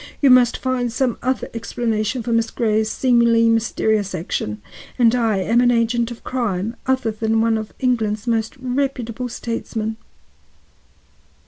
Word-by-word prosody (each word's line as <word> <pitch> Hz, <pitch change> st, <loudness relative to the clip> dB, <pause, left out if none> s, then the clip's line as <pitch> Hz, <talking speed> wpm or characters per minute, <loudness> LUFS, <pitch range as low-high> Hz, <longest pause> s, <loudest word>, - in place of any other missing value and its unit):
You 275 Hz, -3 st, +5 dB
must 250 Hz, -1 st, +5 dB
find 255 Hz, -2 st, -1 dB
some 250 Hz, 0 st, -1 dB
other 255 Hz, +1 st, -1 dB
explanation 230 Hz, 0 st, -2 dB
for 235 Hz, -, -1 dB
Miss 230 Hz, 0 st, +1 dB
Grey's 220 Hz, -1 st, 0 dB
seemingly 235 Hz, -2 st, +3 dB
mysterious 220 Hz, -3 st, 0 dB
action, 110 Hz, -, -3 dB, 0.4 s
and 235 Hz, -2 st, +4 dB
I 225 Hz, -4 st, +1 dB
an 235 Hz, +6 st, +3 dB
agent 235 Hz, 0 st, +1 dB
of 240 Hz, -, -10 dB
crime 225 Hz, -3 st, -2 dB
other 260 Hz, -3 st, +1 dB
than 220 Hz, +1 st, 0 dB
one 225 Hz, 0 st, +2 dB
of 220 Hz, -1 st, -4 dB
England's 220 Hz, -5 st, 0 dB
most 225 Hz, 0 st, -1 dB
reputable 255 Hz, -2 st, -2 dB
statesmen." 225 Hz, -2 st, -4 dB
230 Hz, 135 wpm, -20 LUFS, 220-245 Hz, 0.4 s, You